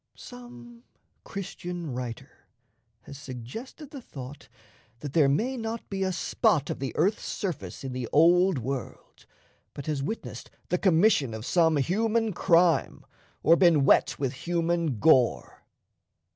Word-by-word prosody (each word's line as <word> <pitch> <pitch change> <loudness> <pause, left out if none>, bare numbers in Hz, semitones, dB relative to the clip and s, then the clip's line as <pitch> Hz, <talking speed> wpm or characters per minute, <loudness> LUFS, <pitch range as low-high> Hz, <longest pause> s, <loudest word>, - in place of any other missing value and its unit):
Some 240 -1 -12 0.4
Christian 175 -5 -6
writer 120 -2 -8 0.5
has 140 - -11
suggested 140 - -9
the 280 -4 -8
thought 135 - -10 0.5
that 145 -2 -6
there 150 -4 +4
may 245 - 0
not 225 0 -5
be 195 -1 -3
a 190 0 +1
spot 180 - +1
of - - -5
the 135 0 -3
earth's 195 +7 +1
surface 135 - -5
in 130 -1 -5
the 125 -2 -4
Old 175 +3 +4
World 130 +1 -6 0.5
but 140 - -7
has 150 -3 -2
witnessed 220 +11 -6 0.2
the 180 - 0
commission 165 - +3
of 110 +1 -7
some 160 -1 +3
human 220 - 0
crime 170 -3 +2 0.4
or 165 - +6
been 170 -6 +4
wet - - +3
with 135 -2 -2
human 170 -1 -1
gore. 130 -2 +2
165 Hz, 135 wpm, -27 LUFS, 135-195 Hz, 0.5 s, or